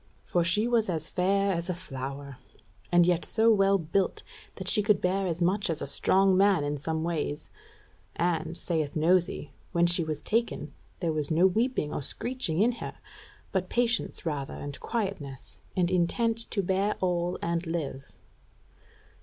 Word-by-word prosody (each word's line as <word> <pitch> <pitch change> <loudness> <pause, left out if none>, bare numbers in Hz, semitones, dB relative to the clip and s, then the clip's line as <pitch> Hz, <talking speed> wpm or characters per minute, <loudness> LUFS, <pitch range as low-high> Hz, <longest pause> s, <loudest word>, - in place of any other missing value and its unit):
For 175 - +1
she 205 +6 +2
was 230 -4 +2
as 165 -3 -2
fair 195 +2 +2
as 170 +1 -3
a 180 - 0
flower; 140 -4 -7 0.5
and 175 -1 +6
yet 175 -1 +2
so 225 0 +3
well 195 -2 +4
built, 185 +3 -1 0.3
that - - -7
she 210 - +4
could 210 0 +3
bear 190 +1 0
as 170 0 -1
much 195 +2 +1
as 160 - -1
a - - -3
strong 190 +7 +3
man 195 -4 +4
in 145 0 -2
some 160 +2 -2
ways; 155 -3 -3 0.6
and, 165 -1 0
saith 155 -4 -2
Nosy, 165 -2 +2 0.2
when 170 0 +4
she 175 0 +2
was 155 -2 -4
taken, 230 +2 -1 0.3
there 165 -3 0
was 150 -2 -2
no 165 +3 +4
weeping 215 - +1
or - - -2
screeching 195 - -2
in 240 - +4
her, - - -5 0.6
but 185 -1 -1
patience 240 -5 0
rather 145 -4 -3
and 145 -1 -7
quietness, 190 - -4 0.2
and 180 -1 +2
intent 225 +6 +1
to 200 - -1
bear 195 +3 +1
all 175 -1 0
and 170 0 -1
live.... 145 -5 -4
175 Hz, 165 wpm, -28 LUFS, 160-195 Hz, 0.6 s, and